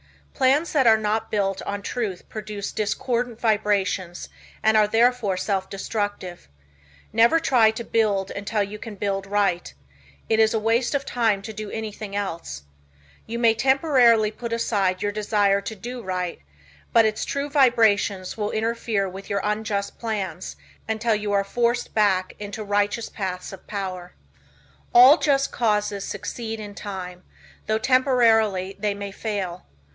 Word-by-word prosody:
Plans 285 Hz, +6 st, +2 dB
that 270 Hz, -5 st, +3 dB
are 220 Hz, -1 st, +7 dB
not 215 Hz, +1 st, -1 dB
built 195 Hz, -2 st, -1 dB
on 200 Hz, 0 st, -4 dB
truth 205 Hz, -6 st, -4 dB
produce 210 Hz, -2 st, -6 dB
discordant 235 Hz, +2 st, -2 dB
vibrations 205 Hz, -5 st, 0 dB, 0.3 s
and 220 Hz, 0 st, +4 dB
are 215 Hz, -1 st, +5 dB
therefore 225 Hz, -3 st, +2 dB
self 190 Hz, 0 st, -1 dB
destructive. 195 Hz, -, -4 dB, 0.6 s
Never 230 Hz, +8 st, +5 dB
try 250 Hz, -8 st, +4 dB
to 220 Hz, +2 st, -4 dB
build 205 Hz, -4 st, 0 dB
until 205 Hz, +1 st, -1 dB
you 205 Hz, +1 st, -7 dB
can 220 Hz, -1 st, -8 dB
build 195 Hz, -1 st, -2 dB
right. 200 Hz, -3 st, 0 dB, 0.6 s
It 220 Hz, -, +2 dB
is 220 Hz, 0 st, +4 dB
a -, -, +2 dB
waste 230 Hz, +5 st, +1 dB
of 280 Hz, -, -1 dB
time 220 Hz, -5 st, 0 dB
to 220 Hz, -, -7 dB
do 215 Hz, 0 st, -6 dB
anything 215 Hz, -2 st, -6 dB
else. 165 Hz, -, -4 dB, 0.6 s
You 230 Hz, -, -4 dB
may 230 Hz, -1 st, +4 dB
temporarily 245 Hz, -4 st, +4 dB
put 235 Hz, +2 st, -7 dB
aside 200 Hz, -5 st, 0 dB
your 205 Hz, -, 0 dB
desire 205 Hz, -1 st, +1 dB
to 220 Hz, +2 st, -6 dB
do 240 Hz, +5 st, -7 dB
right, 180 Hz, -3 st, -3 dB, 0.5 s
but 230 Hz, -1 st, +5 dB
its 215 Hz, 0 st, 0 dB
true 280 Hz, +1 st, -2 dB
vibrations 225 Hz, -9 st, +2 dB
will 210 Hz, -1 st, -2 dB
interfere 220 Hz, -2 st, -1 dB
with 190 Hz, +1 st, -9 dB
your 200 Hz, -1 st, 0 dB
unjust 210 Hz, -1 st, -2 dB
plans 195 Hz, -6 st, -4 dB, 0.3 s
until 220 Hz, +1 st, +1 dB
you 210 Hz, -1 st, -2 dB
are 200 Hz, 0 st, +3 dB
forced 240 Hz, +4 st, -1 dB
back 195 Hz, -4 st, +2 dB
into 205 Hz, +1 st, -6 dB
righteous 205 Hz, +2 st, 0 dB
paths 185 Hz, -2 st, -5 dB
of 195 Hz, -, -12 dB
power. 185 Hz, -3 st, -5 dB, 0.8 s
All 255 Hz, +6 st, +9 dB
just 275 Hz, -2 st, +2 dB
causes 210 Hz, -3 st, 0 dB
succeed 225 Hz, 0 st, -5 dB
in 205 Hz, -1 st, -8 dB
time, 185 Hz, -3 st, -7 dB, 0.5 s
though 215 Hz, 0 st, +2 dB
temporarily 225 Hz, -6 st, +3 dB
they 205 Hz, 0 st, -1 dB
may 200 Hz, 0 st, -6 dB
fail. 195 Hz, -4 st, -4 dB
210 Hz, 150 wpm, -24 LUFS, 200-230 Hz, 0.8 s, All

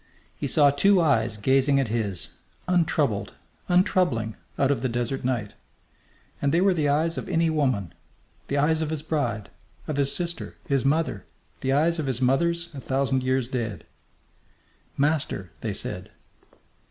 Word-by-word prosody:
He 145 Hz, -, -3 dB
saw 145 Hz, 0 st, +5 dB
two 195 Hz, +7 st, +4 dB
eyes 115 Hz, -9 st, +2 dB
gazing 135 Hz, +5 st, +3 dB
at 135 Hz, -5 st, 0 dB
his, 105 Hz, -6 st, -2 dB, 0.3 s
untroubled, 155 Hz, -, +1 dB, 0.3 s
untroubling, 175 Hz, -, +2 dB, 0.2 s
out 135 Hz, 0 st, +3 dB
of 135 Hz, -, 0 dB
the 130 Hz, -, 0 dB
desert 120 Hz, +3 st, -2 dB
night. 120 Hz, -5 st, -1 dB, 0.9 s
And 140 Hz, -, +2 dB
they 165 Hz, -, +3 dB
were 190 Hz, +1 st, +4 dB
the 155 Hz, -4 st, +1 dB
eyes 160 Hz, +3 st, +1 dB
of -, -, -8 dB
any 165 Hz, -2 st, +2 dB
woman 130 Hz, -, 0 dB, 0.5 s
the 140 Hz, -, -1 dB
eyes 160 Hz, +3 st, +2 dB
of 155 Hz, -, -1 dB
his 155 Hz, -2 st, -3 dB
bride, 145 Hz, -10 st, -2 dB, 0.4 s
of 150 Hz, -, -2 dB
his 140 Hz, -1 st, +2 dB
sister, 170 Hz, -1 st, -4 dB
his 140 Hz, -4 st, +1 dB
mother, 140 Hz, -, 0 dB, 0.4 s
the 135 Hz, -, -1 dB
eyes 160 Hz, +4 st, +2 dB
of 150 Hz, -, -2 dB
his 130 Hz, -3 st, 0 dB
mothers 170 Hz, +6 st, +1 dB
a 135 Hz, -, -7 dB
thousand 135 Hz, 0 st, 0 dB
years 130 Hz, -1 st, 0 dB
dead. 115 Hz, -, -4 dB, 1.1 s
"Master!" 140 Hz, -, 0 dB
they -, -, -2 dB
said. -, -, -5 dB
140 Hz, 155 wpm, -25 LUFS, 125-160 Hz, 1.1 s, saw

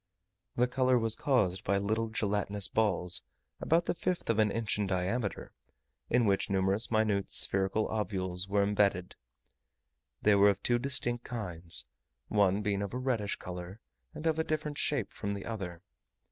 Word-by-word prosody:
The 125 Hz, +1 st, +3 dB
colour 130 Hz, 0 st, +2 dB
was 115 Hz, -1 st, +3 dB
caused 105 Hz, -10 st, +1 dB
by 100 Hz, +1 st, +1 dB
little 110 Hz, +3 st, -1 dB
gelatinous 105 Hz, -2 st, 0 dB
balls, 95 Hz, -5 st, +1 dB, 0.4 s
about 165 Hz, +2 st, +2 dB
the -, -, 0 dB
fifth 175 Hz, -5 st, -1 dB
of 110 Hz, -, -1 dB
an 105 Hz, -1 st, +4 dB
inch 110 Hz, 0 st, -1 dB
in 105 Hz, -, 0 dB
diameter, 95 Hz, +4 st, -2 dB, 0.6 s
in 120 Hz, 0 st, +3 dB
which 100 Hz, -2 st, +1 dB
numerous 95 Hz, +3 st, +1 dB
minute 110 Hz, -3 st, +1 dB
spherical 95 Hz, +3 st, +2 dB
ovules 95 Hz, -4 st, -2 dB
were 100 Hz, 0 st, +2 dB
imbedded: 100 Hz, -3 st, +1 dB, 1.1 s
they 105 Hz, -, +5 dB
were 100 Hz, 0 st, +6 dB
of 100 Hz, -1 st, -1 dB
two 120 Hz, -1 st, +2 dB
distinct 120 Hz, -2 st, 0 dB
kinds, 90 Hz, -8 st, -1 dB, 0.4 s
one 100 Hz, -1 st, +2 dB
being 100 Hz, -1 st, 0 dB
of 100 Hz, +3 st, -4 dB
a -, -, -1 dB
reddish 125 Hz, -6 st, -1 dB
colour 90 Hz, +3 st, -8 dB, 0.4 s
and 155 Hz, -, -7 dB
of 160 Hz, -1 st, +1 dB
a -, -, +2 dB
different 150 Hz, -2 st, -3 dB
shape 135 Hz, -9 st, 0 dB
from 100 Hz, 0 st, -3 dB
the 100 Hz, -, -7 dB
other. 95 Hz, -6 st, -6 dB
105 Hz, 160 wpm, -31 LUFS, 95-120 Hz, 1.1 s, were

